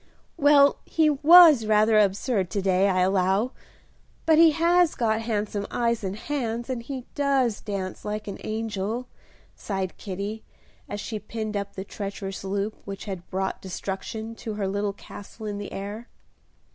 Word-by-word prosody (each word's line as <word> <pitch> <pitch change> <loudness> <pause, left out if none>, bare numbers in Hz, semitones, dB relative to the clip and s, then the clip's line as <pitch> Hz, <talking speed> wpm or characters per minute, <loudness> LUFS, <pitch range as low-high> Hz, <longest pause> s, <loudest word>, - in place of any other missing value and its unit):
"Well, 285 -2 +5
he 315 -2 +2
was 300 -4 +7
rather 215 0 +4
absurd 200 -1 +1
to 200 - -2
day, 190 +1 +3
I 185 -1 +2
allow; 190 +5 +2 0.7
but 320 -1 +5
he 330 0 +8
has 335 +2 +3
got 225 -2 +1
handsome 210 -2 -2
eyes 235 -2 0
and 190 0 -3
hands, 240 -1 -3
and 245 -2 -3
he 255 +1 -6
does 270 -6 +1
dance 195 -3 -5
like 210 0 -4
an 200 - -6
angel," 220 +2 -3 0.5
sighed 190 -3 -4
Kitty, 200 +3 -5 0.5
as 205 - -4
she 215 0 -4
pinned 215 0 -5
up 200 0 -4
the 190 - -4
treacherous 195 -1 -6
loop 200 +2 -2
which 195 -1 -7
had 190 -4 -7
brought 190 +1 -2
destruction 200 +4 -5
to 220 -2 -5
her 200 -2 -2
little 200 +1 -1
castle 205 +2 -11
in 205 -1 -4
the 205 - -7
air. 205 +4 -6
215 Hz, 160 wpm, -25 LUFS, 195-240 Hz, 0.7 s, he